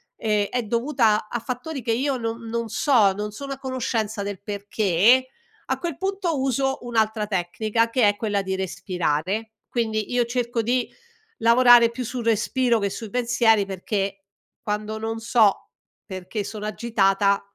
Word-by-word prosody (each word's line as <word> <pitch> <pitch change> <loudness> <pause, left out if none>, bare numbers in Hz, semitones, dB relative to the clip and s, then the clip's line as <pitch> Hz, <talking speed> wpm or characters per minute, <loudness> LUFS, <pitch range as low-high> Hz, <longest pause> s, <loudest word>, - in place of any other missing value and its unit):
ehm, 210 -2 0
è 245 +3 -2
dovuta 230 -2 +1
a 240 - -3
fattori 255 +4 -5
che 230 0 -2
io 265 +4 0
non 230 -1 -3
non 230 0 -3
so, 220 -4 +3
non 210 +2 -4
sono 275 +6 -7
a 270 - -5
conoscenza 230 -5 -2
del 200 -2 -5
perché, 205 +3 +2 0.5
a - - 0
quel 340 -5 -3
punto 385 -4 -1
uso 270 0 0
un'altra 220 -3 0
tecnica, 215 +4 0
che 240 -2 +2
è 205 0 +1
quella 205 -3 -1
di 190 0 -3
respirare. 185 +2 -2 0.2
Quindi, 220 -3 -1
io 245 -1 +2
cerco 240 -1 -1
di 245 +2 0 0.5
lavorare 235 0 +6
più 250 +2 -5
sul 245 0 -5
respiro 235 +2 +2
che 200 -1 0
sui 215 +2 -7
pensieri 235 -3 +2
perché, 195 0 -3 0.4
quando 210 +1 -3
non 225 +1 -4
so, 225 -3 +2 0.4
perché 190 +1 -5
sono 210 +1 -6
agitata 200 -3 +1
225 Hz, 155 wpm, -23 LUFS, 205-245 Hz, 0.5 s, lavorare